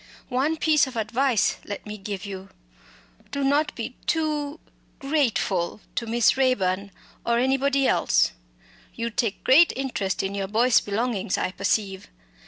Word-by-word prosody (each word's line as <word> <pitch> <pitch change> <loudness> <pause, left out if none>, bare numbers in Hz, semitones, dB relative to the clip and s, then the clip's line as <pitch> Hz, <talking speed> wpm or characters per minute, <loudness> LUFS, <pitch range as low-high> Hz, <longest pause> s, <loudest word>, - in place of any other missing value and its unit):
One 280 +5 0
piece 305 -3 +3
of 260 - -9
advice 230 +1 +1
let 205 - -7
me 210 0 -6
give 200 0 -5
you. 195 -1 -7 0.8
Don't 280 +2 +1
be - - -5
too 305 -2 -1 0.4
grateful 240 - 0
to 235 - -3
Miss 235 +1 +3
Raeburn, 200 -7 +1 0.3
or 235 0 +1
anybody 270 +2 +2
else! - - +3 0.6
You 230 0 -3
take 220 -2 -2
great 310 +7 +6
interest 245 -8 -2
in 195 +1 -2
your 195 -1 -2
Boyce 230 +4 +4
belongings, 205 -2 -1
I - - -1
perceive. 195 0 -1
235 Hz, 135 wpm, -25 LUFS, 200-275 Hz, 0.8 s, great